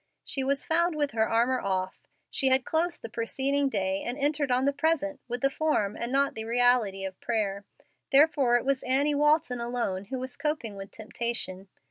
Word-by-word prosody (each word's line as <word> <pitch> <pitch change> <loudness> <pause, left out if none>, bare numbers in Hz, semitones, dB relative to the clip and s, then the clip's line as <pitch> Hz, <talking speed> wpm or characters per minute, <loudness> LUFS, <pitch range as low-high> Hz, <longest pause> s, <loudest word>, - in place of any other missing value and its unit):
She 270 - -3
was 275 +1 0
found 340 +1 +1
with 290 -2 0
her 220 -1 +1
armor 240 +3 +2
off. 185 -1 -3 0.2
She 270 - 0
had 260 -1 +3
closed 340 +2 -1
the - - -4
preceding 270 +5 -1
day 195 -4 -1
and 245 +2 -4
entered 290 0 0
on 255 +1 +2
the 280 - +2
present 295 -1 0
with 245 0 -4
the 275 - +3
form 270 -10 0
and 235 +2 -4
not 275 +1 +2
the 220 0 -5
reality 230 -5 +2
of 190 -1 -7
prayer. 205 -4 -1 0.5
Therefore 280 -3 +5
it 245 - +1
was 275 -1 +1
Annie 275 +3 +1
Walton 295 -3 +2
alone 235 -6 -2
who 260 +6 -4
was 255 0 -6
coping 300 -9 -2
with 195 0 -8
temptation. 220 -4 -5
250 Hz, 190 wpm, -28 LUFS, 220-285 Hz, 0.5 s, Therefore